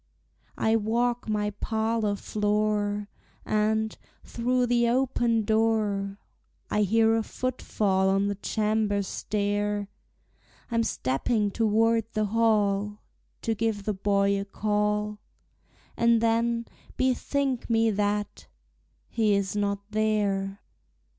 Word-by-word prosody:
I 220 Hz, +1 st, +2 dB
walk 235 Hz, +2 st, 0 dB
my 210 Hz, -1 st, 0 dB
parlor 220 Hz, 0 st, -1 dB
floor, 210 Hz, 0 st, 0 dB, 0.4 s
And, 220 Hz, +1 st, +1 dB, 0.3 s
through 250 Hz, +1 st, 0 dB
the 240 Hz, -1 st, +2 dB
open 240 Hz, -3 st, +1 dB
door, 215 Hz, -3 st, +1 dB, 0.5 s
I 210 Hz, -, +2 dB
hear 225 Hz, +2 st, +3 dB
a 225 Hz, -, +1 dB
footfall 210 Hz, -6 st, 0 dB
on 195 Hz, +1 st, +2 dB
the 205 Hz, -, 0 dB
chamber 210 Hz, 0 st, 0 dB
stair; 205 Hz, +1 st, -2 dB, 0.8 s
I'm 230 Hz, 0 st, +2 dB
stepping 205 Hz, -, 0 dB
toward 225 Hz, +1 st, +2 dB
the 215 Hz, -1 st, +1 dB
hall 210 Hz, -2 st, +1 dB, 0.4 s
To 225 Hz, -, +1 dB
give 220 Hz, -2 st, -1 dB
the 210 Hz, -, -1 dB
boy 200 Hz, 0 st, +1 dB
a -, -, -5 dB
call; 210 Hz, 0 st, -1 dB, 0.8 s
And 235 Hz, 0 st, +4 dB
then 230 Hz, +1 st, +1 dB, 0.3 s
bethink 260 Hz, 0 st, 0 dB
me 225 Hz, -1 st, +3 dB
that 205 Hz, 0 st, -2 dB, 0.6 s
he 215 Hz, -3 st, +2 dB
is 200 Hz, 0 st, -1 dB
not 200 Hz, -1 st, -1 dB
there! 205 Hz, -2 st, 0 dB
215 Hz, 110 wpm, -27 LUFS, 205-225 Hz, 0.8 s, And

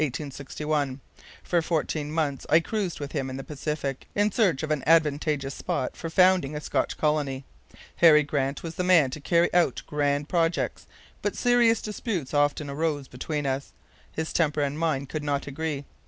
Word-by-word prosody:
For 175 Hz, -1 st, +1 dB
fourteen 155 Hz, -2 st, -2 dB
months 150 Hz, -4 st, -1 dB
I 160 Hz, -, +6 dB
cruised 195 Hz, 0 st, -3 dB
with 145 Hz, -1 st, -5 dB
him 135 Hz, -4 st, -2 dB
in 130 Hz, -, -5 dB
the 135 Hz, -, -6 dB
Pacific 145 Hz, -2 st, -4 dB
in 205 Hz, +1 st, +2 dB
search 185 Hz, -, +2 dB
of 155 Hz, -, -2 dB
an 150 Hz, -3 st, +1 dB
advantageous 150 Hz, -3 st, +2 dB
spot 130 Hz, -, -3 dB
for 165 Hz, -, -5 dB
founding 180 Hz, -4 st, +4 dB
a -, -, -2 dB
Scotch -, -, -1 dB
colony. 145 Hz, -3 st, 0 dB, 0.5 s
Harry 155 Hz, -3 st, +7 dB
Grant 140 Hz, -1 st, -2 dB
was 165 Hz, -1 st, -5 dB
the 180 Hz, -, -2 dB
man 170 Hz, -8 st, +5 dB
to 155 Hz, -, -6 dB
carry 170 Hz, +3 st, +2 dB
out 175 Hz, -1 st, +2 dB
grand 145 Hz, 0 st, 0 dB
projects, 165 Hz, -1 st, 0 dB, 0.3 s
but -, -, -1 dB
serious 240 Hz, -2 st, +3 dB
disputes 205 Hz, -, -3 dB
often 145 Hz, 0 st, +1 dB
arose 145 Hz, -1 st, -2 dB
between 145 Hz, +4 st, -4 dB
us. 135 Hz, 0 st, -2 dB, 0.4 s
His 160 Hz, 0 st, -4 dB
temper 150 Hz, -3 st, +1 dB
and 145 Hz, +1 st, -1 dB
mine 155 Hz, -5 st, 0 dB
could 150 Hz, +3 st, -5 dB
not 145 Hz, -1 st, -1 dB
agree. 145 Hz, 0 st, -4 dB
150 Hz, 170 wpm, -26 LUFS, 140-165 Hz, 0.5 s, Harry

